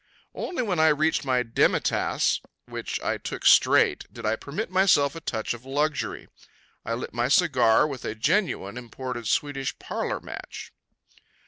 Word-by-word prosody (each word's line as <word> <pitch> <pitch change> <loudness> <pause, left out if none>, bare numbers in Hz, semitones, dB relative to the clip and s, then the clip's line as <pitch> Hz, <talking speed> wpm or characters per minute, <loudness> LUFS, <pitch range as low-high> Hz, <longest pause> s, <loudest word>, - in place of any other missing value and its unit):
Only 335 -8 -3
when 185 -7 -1
I 160 - +5
reached 155 0 +2
my 130 -2 +2
demi 115 -1 +2
tasse, - - 0 0.2
which - - -5
I - - -1
took - - -6
straight, - - +4
did 115 -1 -9
I 110 +1 +2
permit 170 - -5
myself 185 -7 +4
a 165 - -7
touch 110 -5 -2
of 120 0 -10
luxury. 145 +2 -2 0.6
I 115 - -2
lit 120 - -6
my 120 +1 0
cigar 130 -7 +4
with 135 -5 -5
a 110 - -4
genuine 115 - 0
imported 120 -1 -6
Swedish 140 0 -1
parlor - - -3
match. - - -9
135 Hz, 155 wpm, -26 LUFS, 120-155 Hz, 0.6 s, I